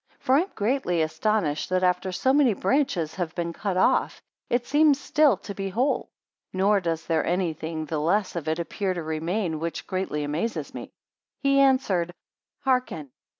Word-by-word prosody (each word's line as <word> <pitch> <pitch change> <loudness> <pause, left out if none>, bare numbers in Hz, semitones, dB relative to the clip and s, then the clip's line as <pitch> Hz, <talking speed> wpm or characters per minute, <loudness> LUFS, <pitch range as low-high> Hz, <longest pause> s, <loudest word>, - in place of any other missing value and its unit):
For 260 - 0
I - - +5
am 375 - -5
greatly 205 -7 +1
astonished, 160 -2 0
that 185 0 +1
after 180 +1 +1
so 260 +8 +1
many 275 -7 +4
branches 185 - 0
have 175 -4 -4
been 170 -1 -2
cut 195 +1 -2
off, 185 - +2 0.3
it 240 0 +1
seems 295 0 +4
still 290 -3 +3
to 200 +2 -8
be 195 0 -4
whole: 245 +9 0 0.4
nor 200 +2 +3
does 165 -3 -3
there 165 -1 +1
any 175 -1 0
thing 160 0 -5
the 155 0 -2
less 185 +6 +1
of 165 -3 -4
it 160 0 0
appear 185 +2 -2
to 170 - -4
remain, 160 +2 -2
which 165 0 -4
greatly 185 -5 -2
amazes 155 +11 -3
me. - - -6 0.6
23 275 - +3
He 275 - +4
answered, 210 -11 +2 0.5
Hearken. 250 - -1
185 Hz, 180 wpm, -25 LUFS, 165-240 Hz, 0.6 s, I